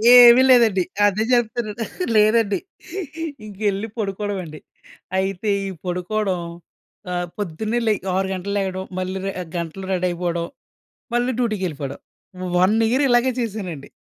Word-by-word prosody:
ఏవీ 245 0 +10
లేదండి. 220 -7 +5 0.2
అదే 205 +2 +2
చెప్తున్నాను. 230 -2 0 0.3
లేదండి. 215 -1 +4 0.9
ఇంకెళ్ళి 205 +1 -2
పడుకోడమే 200 -1 -2
అండి. 155 -1 -9 0.6
అయితే 195 +2 -1 0.2
ఈ - - -3 0.2
పడుకోడం 180 +1 -1 0.7
ఆహ్, 175 0 -1
పొద్దున్నే 210 +4 -2
లె - - +5 0.2
6 190 +1 +1
గంటలకి 190 +2 -3
లెగడం. 190 -1 -2
మళ్ళీ 185 +1 -2
రె 195 - -1 0.3
గంటలో 170 +3 -5
రెడీ 185 -1 +1
అయిపోడం, 170 -1 -2 0.7
మళ్ళీ 240 +1 +2
డ్యూటీకెళ్ళిపోడం. 180 - -2 0.6
1 190 +5 +4
ఇయర్ 270 +3 +3
ఇలాగే 245 +1 +4
చేశానండి. 190 -10 -5
195 Hz, 120 wpm, -22 LUFS, 180-220 Hz, 0.9 s, ఏవీ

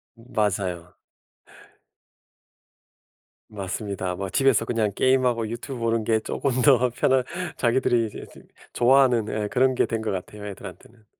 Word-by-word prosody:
맞아요. 100 -7 -3 2.5
맞습니다. 100 -2 -4
뭐 95 +1 -4
집에서 125 +3 +2
그냥 115 -3 0
게임하고 125 -3 +2
유튜브 125 +3 -6
보는 115 -1 0
게 110 0 +2
조금 140 +4 -2
더 125 -3 +5
편한 130 +1 +2 0.3
자기들이 120 -2 +2
이제 - - -9
그 - - -14 0.3
좋아하는 125 -3 +4
예 105 -1 -2
그런 130 +1 +2
게 - - +2
된 115 -2 -3
것 110 - -2
같아요, 105 +2 -6
애들한테는. 110 +3 -11
115 Hz, 285 characters per minute, -24 LUFS, 105-125 Hz, 2.5 s, 더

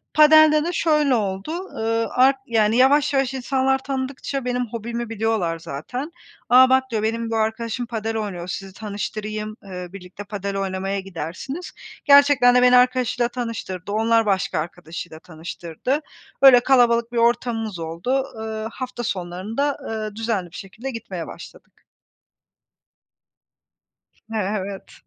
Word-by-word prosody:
padel'de 305 0 +7
de 350 - -2
şöyle 300 -5 +2
oldu, 195 +3 -2
ııı, 230 -11 -2
art 265 +2 +4
yani, 225 -2 +2
yavaş 280 +3 +4
yavaş 270 -1 +1
insanlar 265 +1 +1
tanıdıkça 265 0 -4
benim 250 0 -1
hobimi 235 +1 -5
biliyorlar 215 -7 -1
zaten. 245 - -6 0.4
"A, 255 +1 +7
bak.", 260 0 +4
diyor, 215 -2 -1
"Benim 230 +1 -1
bu 225 - 0
arkadaşım 220 +2 -1
padel 225 -1 -3
oynuyor, 190 -5 -4
sizi 195 +1 -6
tanıştırayım, 215 +1 -5
eee, 180 -2 -7
birlikte 190 +1 -9
padel 200 -1 -4
oynamaya 195 0 -2
gidersiniz." 190 - -6 0.3
Gerçekten 280 -3 +6
de 250 - +6
beni 250 0 +6
arkadaşıyla 250 -1 +2
tanıştırdı, 225 -6 -5
onlar 225 +1 +2
başka 195 -6 0
arkadaşıyla 165 0 -7
tanıştırdı. 170 - -4 0.4
Öyle 265 -3 +9
kalabalık 240 -2 +3
bir 240 - -4
ortamımız 230 -4 0
oldu. 175 +12 -1
Iıı, 220 0 -4
hafta 255 -1 -6
sonlarında, 200 +9 -2
ııı, 215 -2 -4
düzenli 215 -6 -2
bir - - -13
şekilde 220 +7 -7
gitmeye 195 -8 -6
başladık. - - -13 2.5
E - - -1
evet. 200 -1 -4
225 Hz, 130 wpm, -22 LUFS, 195-255 Hz, 2.5 s, Öyle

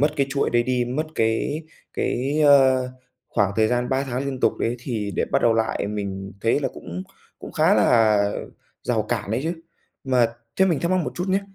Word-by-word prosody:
mất 150 +1 +2
cái 140 -2 +2
chuỗi 140 0 0
đấy 120 0 +3
đi, 125 -1 0
mất 140 +6 -2
cái 115 +8 0 0.3
cái, 140 +5 -1
ơ, 135 -3 +5 0.4
khoảng 100 -1 +1
thời 110 0 +3
gian 125 0 0
3 135 +1 +1
tháng 130 0 -3
liên 135 -2 -4
tục - - +3
đấy 120 +1 -1
thì 115 -5 -3
để - - +2
bắt - - 0
đầu 115 -1 +4
lại 110 -2 0
mình 100 -2 -4
thấy 115 +5 +2
là 140 - 0
cũng 90 +1 -7 0.4
cũng - - -9
khá - - +4
là 105 -3 +4 0.5
rào 115 -3 0
cản 110 -2 -3
đấy 115 - 0
chứ. 165 +3 -1 0.5
Mà 130 -3 +3 0.3
thế 190 - +5
mình 170 -6 +1
thắc 170 - 0
mắc 185 - +3
một - - -4
chút 180 +2 -3
nhá. 195 +1 +2
125 Hz, 215 wpm, -23 LUFS, 110-140 Hz, 0.5 s, ơ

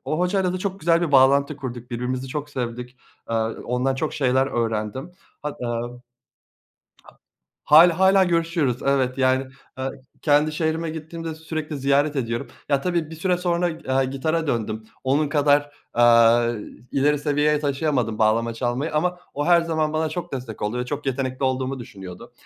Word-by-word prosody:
o 155 - -2
hocayla 180 0 +1
da 185 - -3
çok 195 +1 -4
güzel 165 +1 +3
bir 160 -4 -1
bağlantı 140 +2 +5
kurduk. 125 -3 -7
Birbirimizi 125 +2 -3
çok 150 +2 -5
sevdik. 125 -1 -5 0.3
Eee, - - 0 0.3
ondan 125 +2 0
çok 150 +4 -3
şeyler 130 -1 +2
öğrendim. 115 - -2 0.3
Hat 150 -1 -4
eee. 120 - -3
A 120 0 -2 1.8
Hâlâ 165 +3 +7
hâlâ 190 0 +5
görüşüyoruz. 165 -7 0
Evet, 135 -2 +1
yani, 130 0 +2 0.3
eee, 130 0 -2 0.3
kendi 150 +1 +3
şehrime 160 +1 -1
gittiğimde 160 +1 -6
sürekli 155 -1 -5
ziyaret 140 +2 +2
ediyorum. 115 -3 -2 0.2
Ya 140 -1 +2
tabii 170 -1 -1
bir - - -7
süre 180 +2 +1
sonra 175 0 0
g 160 -3 -10
eee, 130 0 +2
gitara 155 +5 -1
döndüm. 110 -4 -2 0.2
Onun 140 +3 +2
kadar, 145 0 +2 0.2
aaa, 120 0 +5 0.4
ileri 145 +2 +2
seviyeye 150 +1 +1
taşıyamadım 140 -6 -1
bağlama 115 +1 +2
çalmayı 125 +6 -2
ama 180 +4 0 0.2
o 145 +1 -2
her 175 -1 +6
zaman 160 -2 -1
bana 155 0 0
çok 175 +2 -6
destek 125 -6 -6
oldu 105 +4 -1
ve 125 - -2
çok 145 +2 -5
yetenekli 130 0 -2
olduğumu 130 +1 -1
düşünüyordu. 95 -7 -10
140 Hz, 165 wpm, -23 LUFS, 125-160 Hz, 1.8 s, Hâlâ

